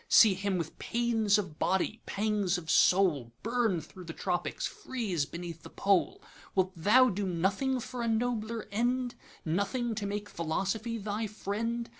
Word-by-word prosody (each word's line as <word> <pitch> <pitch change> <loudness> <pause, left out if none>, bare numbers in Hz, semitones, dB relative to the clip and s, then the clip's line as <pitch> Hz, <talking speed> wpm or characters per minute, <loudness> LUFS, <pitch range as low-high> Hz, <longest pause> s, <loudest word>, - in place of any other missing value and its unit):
See 215 -4 +8
him 190 0 -1
with 165 -2 -5
pains 225 -3 +2
of 185 -7 -4
body, 190 +4 0
pangs 205 -3 0
of 160 -2 -3
soul, 170 -11 +4
Burn 230 -6 +1
thro' 180 +4 -12
the 165 -1 -7
Tropics, 175 - -2
freeze 225 - -2
beneath 170 -1 -7
the - - -11
Pole! 195 -2 +1 0.3
Wilt 185 -1 +2
thou 225 +10 +5
do 200 -1 -2
nothing 195 +10 0
for 245 +1 -5
a 235 - -1
nobler 225 -1 -1
end, 245 +3 0 0.3
Nothing 200 +8 0
to 210 -2 -3
make 205 +1 -3
Philosophy 195 +7 -2
thy 215 +1 -2
friend? 225 +3 -3
205 Hz, 155 wpm, -30 LUFS, 185-230 Hz, 0.3 s, See